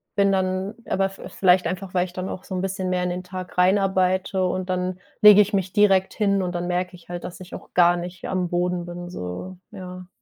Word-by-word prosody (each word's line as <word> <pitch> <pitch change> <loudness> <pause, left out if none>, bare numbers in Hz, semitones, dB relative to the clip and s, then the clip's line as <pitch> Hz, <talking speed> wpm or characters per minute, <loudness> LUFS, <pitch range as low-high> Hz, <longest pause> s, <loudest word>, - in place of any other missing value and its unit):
bin 200 -1 +3
dann 190 +2 -1
aber 195 0 +1
v 195 - -10
vielleicht 180 -2 +3
einfach, 185 +1 -5
weil 180 -1 +2
ich 180 - -12
dann 185 +1 -4
auch 185 - -7
so 190 - -5
'n 180 - -1
bisschen 190 -1 -2
mehr 180 -1 0
in 180 - 0
den 180 +1 -4
Tag 185 0 -8
rein 185 +3 +5
arbeite 190 0 +1
und 185 +1 -3
dann 180 0 -1 0.2
lege 210 -1 +9
ich 210 +1 +1
mich 190 -2 -1
direkt 195 -2 +3
hin 200 -2 +1
und 180 -1 -3
dann 175 0 -2
merke 180 +1 -2
ich 175 0 -18
halt, 175 0 -5
dass 180 - -8
ich 180 - -11
auch - - -10
gar 175 0 +5
nicht 175 +1 -7
am 185 -1 0
Boden 175 0 -1
bin, 175 0 -7
so, 135 - -6
ja. 180 -1 -9
185 Hz, 240 wpm, -23 LUFS, 180-190 Hz, 0.2 s, lege